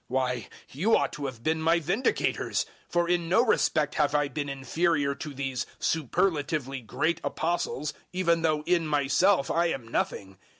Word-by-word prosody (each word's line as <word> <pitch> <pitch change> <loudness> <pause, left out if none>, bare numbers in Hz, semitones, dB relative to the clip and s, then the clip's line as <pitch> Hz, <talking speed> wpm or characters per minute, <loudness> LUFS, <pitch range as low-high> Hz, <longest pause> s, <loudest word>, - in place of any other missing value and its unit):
Why, 125 -3 -1 0.2
you 190 +12 +3
ought - - -1
to 145 -2 -4
have 125 -3 -8
been 160 +2 0
my 165 +2 +3
vindicators; 190 - 0 0.2
for 175 0 +1
in 175 -1 0
no 230 +7 +4
respect 155 - +2
have 150 -1 +1
I 145 -1 +2
been 145 0 -3
inferior 140 +2 0
to 150 +2 -7
these 135 -2 -3
superlatively 150 -4 0
great 160 +8 -1
Apostles, 165 -2 -2 0.2
even 170 -2 +1
though 155 -2 +1
in 170 -1 +1
myself 145 +3 +2
I 170 +1 +2
am 135 -8 -3
nothing. 95 -4 -3
150 Hz, 160 wpm, -28 LUFS, 135-170 Hz, 0.2 s, no